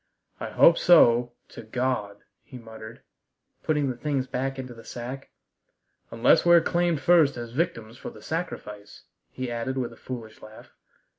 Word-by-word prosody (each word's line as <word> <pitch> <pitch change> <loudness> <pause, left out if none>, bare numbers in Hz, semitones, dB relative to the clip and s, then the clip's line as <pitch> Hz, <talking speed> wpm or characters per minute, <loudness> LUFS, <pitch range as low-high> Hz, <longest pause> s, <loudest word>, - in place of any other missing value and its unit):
"I - - -5
hope 170 - +5
so 120 -8 +5 0.2
to - - -10
God," 110 -3 -3 0.2
he 130 - -11
muttered, 110 -1 -11 0.6
putting 150 -2 0
the 130 - -2
things 140 0 -2
back 135 +1 -3
into 130 -2 -7
the 115 -1 -14
sack, 125 +3 -8 0.8
"unless 115 0 +3
we're 170 0 +7
claimed 170 -1 0
first 160 -5 +4
as 120 -1 -7
victims 120 -6 -3
for - - -7
the - - -15
sacrifice," 105 -11 -6 0.3
he 130 -2 -5
added 120 +3 -3
with 125 -2 -3
a - - -17
foolish 115 -4 -9
laugh. 110 0 -14
125 Hz, 155 wpm, -26 LUFS, 115-145 Hz, 0.8 s, we're